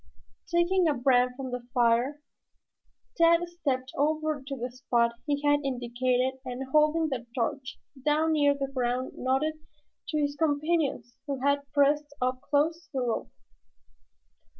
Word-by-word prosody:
Taking 345 +1 +3
a 300 - +2
brand 250 -1 +3
from 265 -2 -5
the 245 -1 -5
fire, 245 +5 +2 0.9
Tad 335 +1 +4
stepped 275 -7 -3
over 310 0 0
to 275 - -3
the 245 +1 -4
spot 240 -2 +1 0.2
he 285 0 -1
had 290 0 +4
indicated 255 0 -1
and 255 0 -5
holding 305 +2 +3
the 245 -4 -4
torch 260 +2 -2 0.3
down 305 +2 +2
near 290 -2 +3
the 275 -1 -2
ground 250 0 -1
nodded 275 +5 0 0.5
to 310 - -2
his 285 -1 0
companions 290 -5 0
who 275 -2 -2
had 280 0 0
pressed 290 0 +2
up 255 0 -1
close 325 +5 0
to - - -45
the 270 - -1
rope. 240 -2 -2
280 Hz, 145 wpm, -28 LUFS, 255-305 Hz, 0.9 s, Tad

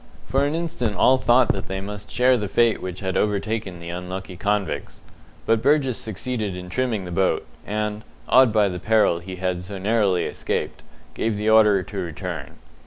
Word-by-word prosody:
For 135 +2 +2
an 145 +2 -1
instant 160 -11 -2
all 130 +7 +4
thought 120 +3 +4
that 95 -1 -1
they 95 0 -3
must 105 +1 -7
share 125 +2 +4
the 105 -4 -2
fate 115 +2 +2
which 90 +1 -6
had 95 -1 -2
overtaken 105 -2 -1
the 85 0 -8
unlucky 90 +2 -6
convicts; 100 +2 -2 0.4
but 115 -1 +2
Burgess 140 -3 +3
succeeded 110 -3 -4
in 90 0 -8
trimming 120 -6 -1
the 90 - -7
boat, 95 +1 +1 0.2
and, 105 0 -2 0.2
awed 130 -2 +6
by 105 -2 +3
the 90 -2 -4
peril 110 -4 +3
he 95 +2 -8
had 90 -1 -2
so 100 +2 -7
narrowly 100 -2 +2
escaped, - - -3 0.3
gave 110 -2 -1
the 105 +1 +1
order 105 -3 +5
to 95 +2 -9
return. 85 -4 -5
105 Hz, 180 wpm, -23 LUFS, 95-115 Hz, 0.4 s, awed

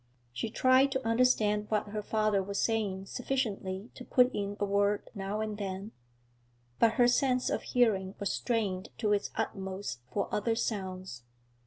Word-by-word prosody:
She 125 - -3
tried 260 +4 +4
to 265 -3 -2
understand 220 -3 +3
what 210 -1 0
her 210 +1 -3
father 215 -1 +1
was 200 +1 -3
saying 205 -4 0
sufficiently 215 -5 -3
to - - -10
put 250 0 +3
in 200 0 -3
a 205 - +1
word 200 +1 +1
now 200 +1 -3
and 215 -1 -3
then, 195 +1 -4 0.9
but 225 -1 +5
her 240 0 +5
sense 255 0 +2
of - - 0
hearing 205 -6 +1
was 200 - -1
strained 205 -6 -1
to 210 -3 +1
its 205 - 0
utmost 190 - -3
for 200 - -1
other 225 +2 +1
sounds. 185 - -3
210 Hz, 160 wpm, -31 LUFS, 195-230 Hz, 0.9 s, but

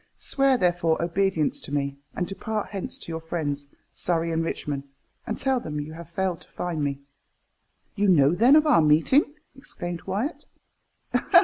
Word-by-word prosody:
Swear, 275 -2 +2
therefore, 175 -4 +2
obedience 170 -2 +1
to - - -8
me, 140 -1 -1 0.2
and 180 - -1
depart 210 +3 -4
hence 195 -2 -4
to - - -6
your 160 - -3
friends, 145 -4 -3 0.3
Surrey 165 -1 0
and 165 0 0
Richmond, 145 -3 -3 0.4
and 220 - -2
tell 265 -2 +2
them 150 -9 -4
you 150 +2 -6
have 170 +1 -10
failed 185 0 -2
to - - -15
find 170 -4 -3
me." 140 -1 -2 0.9
"You 205 +1 +2
know, 150 -5 +5
then, 240 +10 +6
of 310 0 +6
our 170 - +5
meeting?" 165 - +4 0.2
exclaimed 175 -10 -4
Wyat. 235 - -2
170 Hz, 165 wpm, -25 LUFS, 155-200 Hz, 0.9 s, then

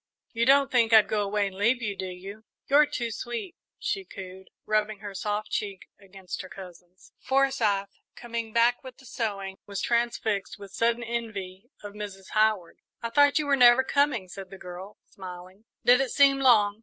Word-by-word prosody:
You 235 +1 0
don't 275 0 +5
think 235 -3 +3
I'd 220 -1 +7
go 210 - 0
away 205 0 0
and 195 -1 -6
leave 235 +5 +2
you, 210 -4 -3
do 190 - -5
you? 195 +4 -9 0.2
You're 290 +2 +5
too 235 -4 -3
sweet," 240 - -5 0.2
she 460 -6 -3
cooed, 190 - -11 0.2
rubbing 215 0 0
her 205 -2 -7
soft 210 +3 -3
cheek 200 -2 -4
against 195 -2 -8
her 185 - -11
cousin's. 180 -1 -13
Forsyth, 255 -8 +1 0.3
coming 235 -2 -5
back 235 +3 +2
with 260 -1 -11
the 265 - -18
sewing, 200 -5 -4
was 200 -1 -4
transfixed 235 -5 -1
with 200 -2 -11
sudden 235 +2 +1
envy 220 -3 -5
of 205 -1 -8
Mrs. 200 -2 -8
Howard. 215 -5 +1 0.2
"I 230 - -3
thought 285 +3 +4
you 305 - +1
were 285 -1 +3
never 250 0 +6
coming," 270 -8 +1
said 190 +1 -9
the 195 - -10
girl, 185 +3 -10
smiling. 185 +2 -11 0.2
"Did 250 +2 +6
it 270 - -1
seem 275 -1 +4
long?" 215 -6 +4
215 Hz, 180 wpm, -27 LUFS, 195-240 Hz, 0.3 s, I'd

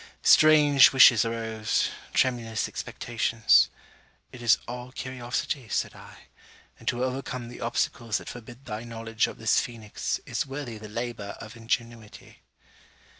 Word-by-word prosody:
Strange 150 -3 +7
wishes 125 -4 +7
arose 115 -1 -1 0.2
tremulous 115 -4 0
expectations. 115 -1 +1 0.6
'It 125 - -11
is 120 -1 +4
all 125 +1 -7
curiosity,' 130 -1 -4
said - - -1
I; - - -14 0.6
'and - - -16
to 120 +1 0
overcome 125 -2 -4
the 120 - -11
obstacles 115 -1 -1
that - - -10
forbid 120 +2 -10
thy 110 0 -5
knowledge 115 -1 -2
of - - -9
this 110 0 +2
Phoenix, 110 -4 -4
is - - -2
worthy 135 -5 -6
the 105 0 -10
labour 115 -2 -5
of 110 0 -10
ingenuity.' 115 -1 -5
120 Hz, 130 wpm, -26 LUFS, 115-125 Hz, 0.6 s, Strange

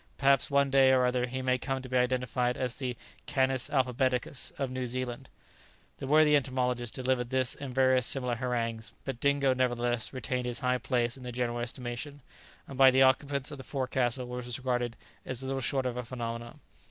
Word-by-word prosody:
Perhaps 135 -1 +3
one 140 -1 +2
day 135 -1 +6
or 130 -1 +4
other 125 0 +1
he 130 +1 -4
may 130 0 +1
come 135 +1 -2
to - - -7
be 130 - -4
identified 125 0 +1
as 125 -2 -1
the 125 -4 -4 0.3
'canis 130 -3 +1
alphabeticus' 130 -1 +1
of 135 -2 -2
New 130 -1 -3
Zealand." 125 0 -4 0.7
The 135 - -6
worthy 150 +1 +5
entomologist 125 -3 -1
delivered 130 -2 0
this 130 -1 +3
and 135 -3 -8
various 130 -2 +4
similar 125 -3 +2
harangues; 115 -2 -3
but 135 -3 -4
Dingo, 140 -1 +2
nevertheless, 120 -2 0
retained 130 -1 -3
his 120 - -3
high 125 -1 +1
place 120 0 0
in - - -13
the 125 0 -6
general 120 -1 -2
estimation, 125 +4 -5 0.5
and 135 -1 -9
by 135 -1 +9
the 130 +1 +5
occupants 140 +2 +1
of 145 - -8
the - - -8
forecastle 130 -2 -1
was 125 -1 -5
regarded 125 -2 -1 0.3
as 130 0 -4
little 135 0 -2
short 130 +1 0
of 125 -1 -2
a - - -1
phenomenon. 115 -1 -6
130 Hz, 190 wpm, -29 LUFS, 125-135 Hz, 0.7 s, by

